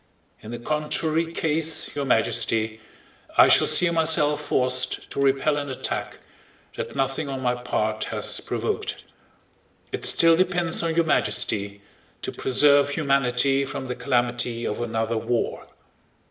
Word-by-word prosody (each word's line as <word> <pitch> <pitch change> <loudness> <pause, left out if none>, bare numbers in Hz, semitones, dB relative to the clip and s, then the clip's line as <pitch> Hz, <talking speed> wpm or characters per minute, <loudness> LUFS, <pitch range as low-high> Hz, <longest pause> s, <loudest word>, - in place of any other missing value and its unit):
In 110 - -10
the 120 - -5
contrary 155 +4 -1
case, 160 -1 -1
Your 140 -1 -2
Majesty, 110 -2 +1 0.6
I - - +8
shall - - +5
see 180 - +5
myself 155 -2 +1
forced 125 -1 -1
to - - -2
repel 140 +2 +2
an 145 -1 -4
attack 130 - -4 0.6
that - - -6
nothing 135 +2 -1
on 135 -1 -4
my 125 -1 +2
part 110 -3 -2
has - - -3
provoked. - - -3 0.9
It - - -5
still 165 -1 +5
depends 175 -2 0
on 165 -1 -1
Your 170 0 +3
Majesty 100 -9 -1 0.4
to - - -3
preserve 140 +2 +3
humanity 140 -2 +1
from 135 0 -5
the 125 - -3
calamity 120 -2 -1
of 105 - -3
another 115 -1 -1
war. 120 +1 -2
135 Hz, 135 wpm, -24 LUFS, 120-155 Hz, 0.9 s, I